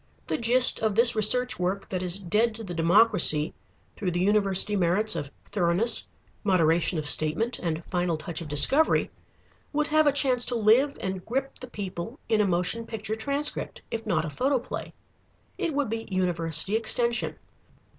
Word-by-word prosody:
The - - -3
gist 245 +2 +4
of 215 -2 -1
this 235 +1 +5
research 220 +2 +2
work 185 +2 -2
that 185 -1 -3
is 180 0 -1
dead 210 +4 0
to 225 - -8
the 180 -4 -7
democracy, 170 -3 +4 0.4
through 195 -4 -3
the 175 0 -2
university 200 +1 +3
merits 200 +4 +1
of 140 - -5 0.2
thoroughness, 200 +4 +2 0.4
moderation 175 -3 +2
of 155 -1 -4
statement, 155 +12 0
and 165 -1 -4
final 175 -3 -2
touch 165 +2 -6
of 165 - -7
discovery, 270 - +3 0.6
would 300 0 0
have 310 0 +3
a - - +5
chance 260 -3 +1
to 245 - 0
live 235 +6 +3
and 190 -1 -5
grip 270 +3 -4
the 255 - -9
people 200 - -7
in 220 -1 +2
a 205 - +1
motion 180 +6 -1
picture 220 -1 -5
transcript, 280 +6 -3
if 225 -1 -5
not 165 -6 0
a 155 - -6
photoplay. 255 - -2 0.7
It 320 -4 -2
would 285 -6 -1
be 225 0 -5
University 175 0 0
Extension. 235 +1 0
210 Hz, 165 wpm, -26 LUFS, 175-235 Hz, 0.7 s, this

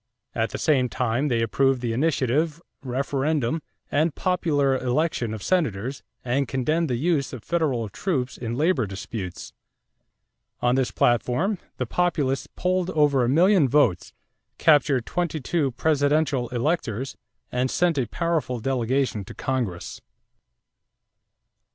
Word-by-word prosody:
At - - 0
the - - -5
same 130 -5 +2
time 125 +4 0
they 115 -4 +1
approved 135 +2 +2
the 120 -2 -2
initiative, 150 +3 +1 0.2
referendum, 140 +2 -1 0.3
and 155 +2 +1
popular 150 -7 +1
election 130 -2 0
of 110 -3 -6
Senators, 135 - 0 0.2
and 130 +2 0
condemned 155 +6 0
the 125 - +1
use 145 +1 0
of 120 -4 -7
federal 145 -10 0
troops 130 - -2
in 120 -1 -4
labor 150 - +2
disputes. 95 -1 -6 1.1
On 120 0 +2
this 130 -1 +1
platform, 125 - +1 0.2
the 125 - -1
Populists 145 -2 0
polled 185 0 0
over 145 -6 +3
a 120 - +1
million 170 0 +4
votes, 120 - +2 0.5
captured 145 -6 +4
twenty 170 -3 -2
two 145 +1 0
presidential 145 -3 +1
electors, 125 -2 -1 0.4
and 125 +1 0
sent 170 -1 +1
a 125 - 0
powerful 160 -4 -1
delegation 130 -2 0
to - - -10
Congress. 120 -10 -3
135 Hz, 125 wpm, -24 LUFS, 120-160 Hz, 1.1 s, million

